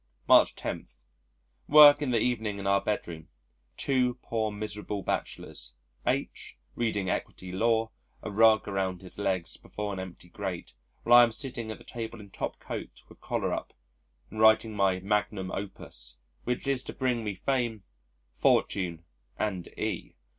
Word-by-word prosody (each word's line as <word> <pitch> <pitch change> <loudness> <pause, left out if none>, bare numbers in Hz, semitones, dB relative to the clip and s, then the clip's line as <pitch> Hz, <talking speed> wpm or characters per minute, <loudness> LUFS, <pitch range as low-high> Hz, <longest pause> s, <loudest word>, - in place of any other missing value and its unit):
March - - +6
10. - - -5 0.8
Work 145 0 +9
in 145 - 0
the 120 -2 +2
evening 110 -4 0
in 100 - -6
our 100 0 +3
bedroom 85 -6 -3 0.5
two 125 -3 +1
poor 110 -2 -1
miserable 105 -1 -4
bachelors - - -4 0.3
H - - -2 0.2
reading 105 -5 -1
Equity 90 0 -3
Law, 110 +3 +1 0.3
a 110 - -4
rug 110 +1 +5
around 95 -2 -2
his 95 - -10
legs 95 -3 -1
before 105 -1 -5
an 95 - -5
empty 95 -1 -8
grate, 95 -1 -5 0.3
while 120 +1 +8
I - - +9
am 120 - +3
sitting 120 -2 -4
at 110 - -5
the - - -16
table 115 -1 -6
in 100 -1 -12
top - - -4
coat, - - -7
with - - -17
collar - - -1
up, - - -5 0.6
and 110 - -7
writing 110 0 +5
my 95 -2 +2
magnum 105 -1 -1
opus, 65 -11 -5 0.3
which 125 +2 -2
is 135 -2 +1
to - - -6
bring 125 -3 0
me 105 -2 -3
fame, 120 -1 -1 0.5
fortune 85 +5 +1 0.3
and 95 -5 -2
E - - -3
105 Hz, 155 wpm, -29 LUFS, 95-115 Hz, 0.8 s, Work